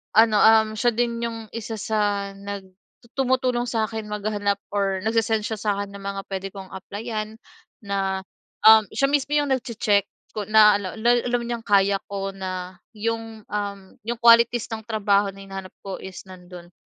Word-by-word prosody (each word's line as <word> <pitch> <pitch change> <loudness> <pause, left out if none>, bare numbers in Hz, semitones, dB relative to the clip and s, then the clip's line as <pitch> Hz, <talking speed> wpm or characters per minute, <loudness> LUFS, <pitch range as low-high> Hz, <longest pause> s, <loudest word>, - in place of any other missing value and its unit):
ano, 220 -1 +6
um, 220 0 +6
siya 240 +3 +2
din 235 0 0
yung 230 -1 -4
isa 225 -1 -5
sa 205 -1 -1
nag 200 0 -7 0.5
tumutulong 255 -2 +1
sa'kin 220 -1 -2
maghanap 205 -1 -1 0.2
or 195 -2 0
nagse-send 225 -1 +1
siya 220 -2 -3
sa'kin 200 -1 -1
ng 200 - -9
mga 195 0 -4
puwede 195 0 -4
kong 195 -2 -8
applyan 215 +3 -5 0.5
na, 195 -1 -1 0.5
um, 220 0 +9
siya 275 - +2
mismo 285 -1 +1
yung 290 -2 +1
nagche-check, 215 -5 +1 0.3
ko 210 -1 -3
na 215 -1 +6
al 190 -2 -6
ala 240 +2 +4 0.2
alam 245 0 0
niyang 235 -1 -4
kaya 200 -1 +3
ko 195 -1 -4
na, 185 -1 -6 0.2
yung, 225 0 -4
um, 205 -1 -3 0.3
yung 235 0 -3
qualities 235 0 +6
ng 220 0 -4
trabaho 205 -3 +2
na 195 0 -12
hinahanap 195 -1 -8
ko 195 -1 -5
is 190 -1 -9
nando'n. 180 -1 -12
210 Hz, 165 wpm, -24 LUFS, 195-225 Hz, 0.5 s, um